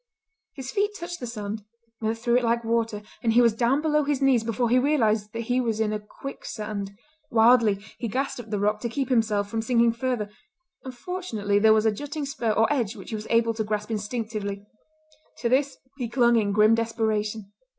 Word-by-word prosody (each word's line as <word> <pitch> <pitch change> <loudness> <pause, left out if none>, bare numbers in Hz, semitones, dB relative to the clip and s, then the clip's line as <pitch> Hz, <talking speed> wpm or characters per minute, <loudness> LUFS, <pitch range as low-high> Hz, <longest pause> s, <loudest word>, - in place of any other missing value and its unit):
His 265 -3 -6
feet 410 +1 0
touched 350 -1 -6
the 245 - -5
sand—went 220 +1 -6
through 235 +1 +2
it 250 - +1
like 235 0 +1
water—and 225 0 -1
he 240 - +6
was 230 -2 +4
down 245 +6 +1
below 300 -1 +2
his 285 -1 0
knees 265 -4 +3
before 235 +2 0
he 245 +2 +4
realised 225 -7 +1
that 230 - -3
he 245 +2 0
was 225 -3 -1
in 215 -1 +1
a 210 - -2
quicksand. 210 -3 -7 0.3
Wildly 230 -2 +5 0.2
he 235 - -2
grasped 260 +4 -2
at 225 -2 -9
the 210 - -1
rock 210 +1 +1
to 235 - -3
keep 270 +2 -2
himself 220 -5 +2
from 225 +2 -2
sinking 235 0 +3
further, 235 -3 -2 0.5
and 260 -2 -8
fortunately 235 - -1
there 220 +1 +5
was 215 0 +4
a 220 - +4
jutting 290 +6 -5
spur 270 -5 -2
or 220 +1 +3
edge 240 -5 -1
which 195 - -10
he - - -2
was 215 0 -6
able 230 0 +3
to 220 0 -2
grasp 210 +1 -3
instinctively. 210 -2 -4 0.7
To 235 - -1
this 270 +1 +1 0.2
he 240 -3 -2
clung 240 -1 +4
in 210 -3 +2
grim 215 +2 +5
desperation. 220 -2 -1
230 Hz, 200 wpm, -25 LUFS, 215-250 Hz, 0.7 s, he